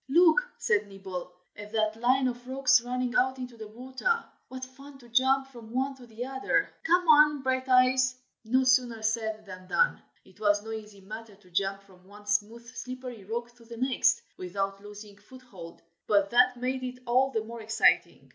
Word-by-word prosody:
"Look!" 345 - +5
said 210 -1 +1
Nibble, 190 -2 -7 0.2
"at 205 0 -10
that 215 -1 +1
line 255 +3 +2
of 245 0 -5
rocks 260 -2 +4
running 250 0 -2
out 260 +1 +2
into 250 -2 -7
the 220 -1 -9
water. 260 - -2 0.2
What 260 0 -7
fun 275 +2 -14
to 240 -3 -17
jump 265 +3 +2
from 235 -4 -12
one 265 +4 -1
to 250 -2 -14
the 230 +2 -6
other! 270 +10 0
come 355 +2 +3
on, 300 -2 +6
Brighteyes!" 255 0 +3 0.3
No 255 +4 +2
sooner 250 -3 +2
said 220 -1 -1
than 185 -1 -10
done. - - +2 0.2
It 190 - -21
was 205 -1 +2
no 220 - -7
easy 210 -2 -8
matter 215 +2 -9
to 185 -2 -23
jump 195 +2 -1
from 185 -2 -21
one 205 +1 -15
smooth 210 +3 -1
slippery 250 -3 -8
rock 235 +3 -4
to 235 - -18
the 230 0 -10
next, 255 +1 +2
without 195 +2 -3
losing 205 0 -11
foothold, 210 -7 -13 0.2
but 200 -2 +3
that 250 +1 +4
made 255 +1 -2
it 250 0 -6
all 255 +3 +3
the 220 -5 -2
more 230 +1 -8
exciting. 220 +1 +2
240 Hz, 185 wpm, -28 LUFS, 210-260 Hz, 0.3 s, on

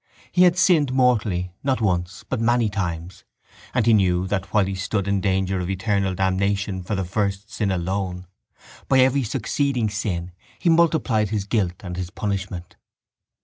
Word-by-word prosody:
He 180 0 +5
had 175 0 +4
sinned 160 -8 +4
mortally 110 -9 +1
not 135 -1 +1
once 90 -3 -1
but 130 -4 -2
many 120 -1 +2
times 90 -4 -4 0.5
and 125 -4 +1
he 115 - +5
knew 90 -3 +3
that, 95 0 -3
while 105 -3 +3
he 95 - -3
stood 100 +1 -2
in 100 -1 +1
danger 95 -1 0
of 90 0 -3
eternal 95 -1 0
damnation 95 +1 0
for 90 +4 -3
the 95 -1 -2
first 100 +2 -2
sin 105 -3 -1
alone, 95 0 -2 0.6
by 135 - +3
every 130 +2 +4
succeeding 125 -1 -1
sin 90 -4 -3 0.3
he 170 - +1
multiplied 155 - +2
his 105 -2 -1
guilt 100 -5 -1
and 90 -2 -6
his 90 -1 -4
punishment. 95 -3 -4
100 Hz, 165 wpm, -23 LUFS, 95-115 Hz, 0.6 s, He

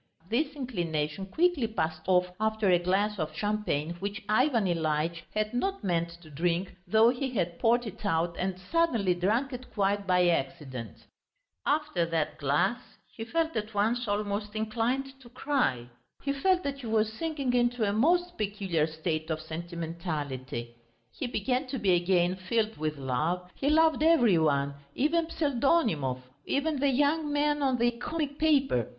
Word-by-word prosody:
This 285 +5 0
inclination 175 - -2
quickly 320 - +2
passed 160 -7 -2
off 180 -1 +4
after 220 -2 +1
a 175 - +5
glass 195 +4 0
of 155 -1 -3
champagne 205 -7 -1
which 200 +3 -4
Ivan 230 0 +3
Ilyitch 165 -1 0
had 215 +1 0
not 385 - -1
meant 170 -3 0
to 155 - -14
drink, 175 +5 -1
though 220 +4 +5
he 265 +2 -1
had 175 -8 -2
poured 240 +1 +3
it 215 0 -8
out 170 -2 0
and 185 0 -1
suddenly 230 - +1
drunk 220 +10 0
it 250 +1 -8
quite 200 -1 0
by 180 -1 +4
accident. 135 -6 -3 0.6
After 300 - +1
that 160 -2 -1
glass 175 - +1 0.3
he 225 - -6
felt 325 +6 -1
at 215 0 -3
once 230 +4 +1
almost 205 +1 -2
inclined 245 +5 -1
to 240 - -14
cry. 250 - 0 0.4
He 280 - 0
felt 365 +6 +2
that 280 -1 -3
he 245 - -7
was 220 0 +1
sinking 285 -2 -2
into 240 -2 +2
a 200 - 0
most 350 +10 +2
peculiar 195 -7 0
state 160 0 -3
of 160 -1 -1
sentimentality; 160 -7 -5 0.4
he 265 - -4
began 250 +4 -1
to 265 - -3
be 200 -5 +2
again 175 0 +2
filled 220 +4 -1
with 155 0 -3
love, 155 +8 -2
he 280 - -1
loved 315 0 +4
every 245 - +5
one, 140 -2 +1 0.2
even 320 +4 +1
Pseldonimov, 240 - +1 0.2
even 290 0 0
the 285 +1 +3
young 290 +3 +2
man 295 0 +1
on 265 -2 +2
the 240 0 +3
comic 285 +4 -4
paper. 275 - +2
210 Hz, 160 wpm, -29 LUFS, 170-265 Hz, 0.6 s, a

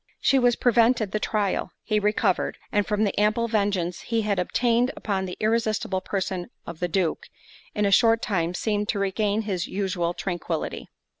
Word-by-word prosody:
She 270 - +3
was 245 -1 +3
prevented 230 -3 +3
the 215 - -1
trial; 210 -2 -1
he 215 -2 +1
recovered; 210 +1 +1
and 205 -1 +1
from 210 0 +1
the 205 - 0
ample 215 +3 +2
vengeance 200 -5 0
he 230 -2 -1
had 205 -2 0
obtained 240 +6 +2
upon 195 -3 -2
the 180 - -6
irresistible 215 -3 0
person 185 -2 -3 0.2
of 170 -1 -8
the 180 - 0
Duke, 175 -2 -1 0.5
in 210 -1 +1
a 200 - +2
short 225 +3 +5
time 180 -6 -1
seemed 210 +1 -1
to - - 0
regain 205 +2 0
his 190 -5 -2
usual 185 -3 -2
tranquillity. 175 -3 -4
205 Hz, 170 wpm, -25 LUFS, 185-220 Hz, 0.5 s, short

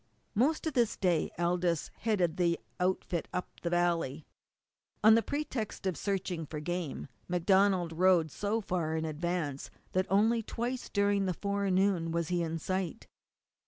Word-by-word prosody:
Most 285 +10 +2
of 315 - -1
this 240 -4 +2
day 175 -4 +1
Aldous 175 -1 0
headed 185 -7 +1
the 170 -2 +2 0.2
outfit 180 -2 0
up 180 - -5
the 170 - -1
valley. 170 -4 0 0.8
On 220 +1 +9
the 230 - +5
pretext 265 -8 -3
of 185 -2 0
searching 185 -5 -2
for 150 - -5
game 170 -2 -3 0.2
MacDonald 180 0 +3
rode 175 -2 +4
so 210 +7 -1
far 170 -5 -1
in 160 - -1
advance 155 -2 -2 0.2
that 185 0 +1
only 220 +4 +3
twice 240 +3 -4
during 200 -1 +2
the 180 - -1
forenoon 195 -3 +1
was 170 0 -1
he 175 -1 +1
in 165 0 -2
sight. 185 +1 -3
180 Hz, 150 wpm, -31 LUFS, 170-200 Hz, 0.8 s, On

